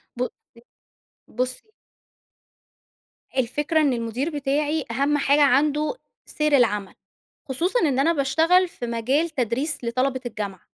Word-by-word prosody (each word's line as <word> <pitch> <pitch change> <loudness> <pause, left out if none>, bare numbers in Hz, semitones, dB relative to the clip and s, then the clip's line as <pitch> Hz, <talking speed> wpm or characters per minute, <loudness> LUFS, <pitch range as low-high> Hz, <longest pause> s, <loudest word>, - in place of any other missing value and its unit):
ب - - -12
ص - - -2 1.1
بُصّي 255 +1 -1 1.8
الفكرة 295 +6 +1
إن 280 -4 +2
المُدير 235 +6 -2
بتاعي 295 +1 -1
أهم 280 +4 +1
حاجة 285 +1 +3
عنده 295 - +3 0.3
سير 300 -1 +1
العمل. 210 -5 +1 0.6
خصوصًا 350 - 0
إن 280 -5 +1
أنا 325 +5 +3
باشتغل 325 +6 +3
في 240 - -7
مجال 260 +8 0
تدريس 260 +1 -2
لطلبة 255 +2 0
الجامعة. 205 -5 -5
275 Hz, 115 wpm, -23 LUFS, 245-300 Hz, 1.8 s, حاجة